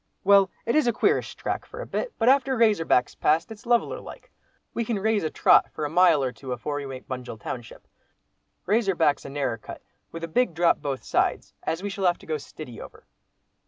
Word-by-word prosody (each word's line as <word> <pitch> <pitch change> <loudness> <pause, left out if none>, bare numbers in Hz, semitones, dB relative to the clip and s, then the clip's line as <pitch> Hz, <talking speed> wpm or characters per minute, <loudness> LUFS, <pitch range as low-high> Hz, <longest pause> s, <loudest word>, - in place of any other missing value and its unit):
"Well, 195 -1 +6 0.2
it 235 - 0
is 305 -5 +3
a 240 - +3
queerish - - +1
track - - -3
for 465 - -11
a - - -4
bit, - - -3
but 225 - +1
after 265 0 +4
Razor 215 -7 +3
Back's 125 -4 +2
passed, 160 +6 +1
it's 220 +3 -11
leveller 240 - +2
like. - - -12 0.4
We 235 - -1
can 225 -1 -2
raise 215 0 +1
a 155 - 0
trot - - +4
for 150 - -4
a 145 - -4
mile 170 -4 +5
or 130 - -1
two 130 0 -9
afore 145 +5 -4
we 140 -1 -5
make 130 -1 -8
Bunjil 125 -3 -6
township. 120 0 -7 0.8
Razor 205 -1 +2
Back's 150 -4 +2
a - - -6
narrer 135 -5 -2
cut - - -10 0.3
with 165 0 -7
a - - -2
big 185 +1 +1
drop 170 0 +3
both 135 -2 -3
sides, - - 0
as 165 +4 -3
we 205 - -3
shall 195 -1 0
have 175 - +2
to - - -16
go 155 -1 -2
stiddy 135 -4 -10
over." - - -12
170 Hz, 225 wpm, -25 LUFS, 145-225 Hz, 0.8 s, Well